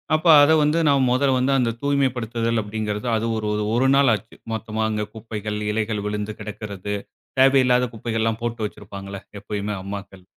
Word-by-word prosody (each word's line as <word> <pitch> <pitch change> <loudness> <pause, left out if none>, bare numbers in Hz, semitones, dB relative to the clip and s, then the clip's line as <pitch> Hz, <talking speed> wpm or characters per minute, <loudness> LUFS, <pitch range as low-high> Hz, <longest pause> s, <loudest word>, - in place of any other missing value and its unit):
அப்ப 160 +2 0
அதை 145 +2 +6
வந்து 150 +3 +2
நாம 140 -2 +4
முதல்ல 130 +1 +3
வந்து, 130 +2 +2
அந்த 115 -2 +1
தூய்மைப்படுத்துதல் 120 -5 0
அப்பிடீங்கிறது 105 +2 -4
அது 110 - -1
ஒரு 110 - -3
ஒரு 105 0 -1
ஒரு 130 +2 +3
நாள் 140 -3 +5
ஆச்சு. 105 +2 -11 0.2
மொத்தமா 110 0 -3
அங்கே 105 -1 -1
குப்பைகள், 105 -1 -5
இலைகள் 105 -1 -1
விழுந்து 105 0 -3
கிடக்கிறது. 105 -1 -5 0.4
தேவையில்லாத 130 -2 +5
குப்பைகள்லாம் 115 0 -1
போட்டு 115 -1 -3
வைச்சிருப்பாங்கள்ல? 100 -1 -8 0.2
எப்பயுமே 105 0 -3
அம்மாக்கள் 100 -1 -8
110 Hz, 155 wpm, -23 LUFS, 105-125 Hz, 0.4 s, அதை